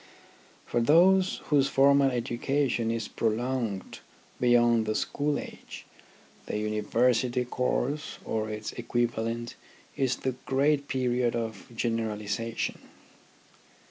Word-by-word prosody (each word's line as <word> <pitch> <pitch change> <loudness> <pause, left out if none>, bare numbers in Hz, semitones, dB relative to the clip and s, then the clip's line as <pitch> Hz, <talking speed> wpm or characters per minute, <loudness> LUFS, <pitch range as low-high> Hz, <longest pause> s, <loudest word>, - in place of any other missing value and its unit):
For 120 - 0
those 185 +8 +4
whose 140 -2 +4
formal 140 0 +4
education 120 0 -1
is 115 -2 -2
prolonged 115 -3 -2 0.4
beyond 120 -2 +4
the 110 - 0
school 145 0 -1
age, - - -9 0.6
the - - -2
University 120 +4 +1
course 125 +3 -2
or 110 -1 -2
its 105 0 -5
equivalent 120 -1 -2 0.4
is 130 -2 +1
the 130 - -2 0.2
great 140 +1 +2
period 125 -2 0
of 110 -3 -4
generalization. 115 -1 -2
120 Hz, 100 wpm, -28 LUFS, 115-135 Hz, 0.6 s, those